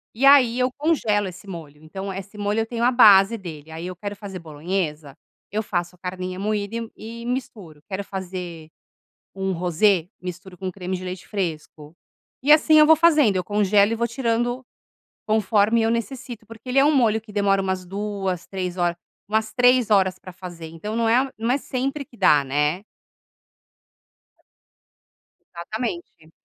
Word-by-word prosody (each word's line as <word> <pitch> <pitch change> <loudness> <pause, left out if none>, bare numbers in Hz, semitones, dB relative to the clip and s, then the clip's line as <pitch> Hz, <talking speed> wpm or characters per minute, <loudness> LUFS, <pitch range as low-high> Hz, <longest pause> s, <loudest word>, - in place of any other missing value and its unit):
E 255 +5 +1
aí, 260 -4 +6
eu 250 0 +2
congelo 225 -10 +1
esse 185 +2 -10
molho. 155 -5 -9
Então, 190 +5 -6
esse 195 +2 -8
molho, 205 +1 -1
eu 225 - +1
tenho 235 -1 -3
a 245 - +4
base 210 -3 +7
dele. 160 -5 -9
Aí 165 +2 -6
eu 185 - -6
quero 205 +3 -6
fazer 195 -2 -8
bolonhesa, 155 -2 -4 0.3
eu 215 +2 -1
faço 175 -3 -3
a - - -27
carninha 185 0 -5
moída 205 +1 -2
e 230 - -1
m 230 -1 -7
e 230 +2 -9
misturo. 210 - -5
Quero 195 0 -3
fazer 180 -4 -7 0.7
um 190 0 -2
rosé, 180 +1 +2
misturo 180 +1 -8
com 190 0 -4
creme 185 0 -4
de 185 - -8
leite 180 -1 -6
fresco, 160 -5 -5 0.5
e 295 - +6
assim 310 0 +6
eu 305 - +8
vou 320 - +7
fazendo. 300 - +4
Eu 185 - -1
congelo 205 +1 +3
e - - +1
vou 235 +1 0
tirando 240 +1 -1 0.6
conforme 215 +1 +2
eu 225 - +2
necessito. 235 -1 -4
Porque 230 +3 -13
ele 255 - +2
é 275 - +6
um 300 +1 +4
molho 225 -5 +3
que 215 -1 -14
demora 200 -1 +2
umas 190 -1 -2
2, 195 -2 -3
3 185 -2 -4
horas, 175 -1 0 0.3
umas 220 +1 0
3 245 -2 +4
horas 190 -2 +3
para 185 - -11
fazer. 175 -2 -9
Então 165 +7 -6
não 230 0 +1
é 255 +4 +3
não 225 +2 -1
é 260 - +3
sempre 275 +2 -3
que 255 - -20
dá, 145 -2 +5
né? 150 +6 0 2.7
Exatamente. 170 -4 -6
200 Hz, 175 wpm, -23 LUFS, 180-230 Hz, 2.7 s, eu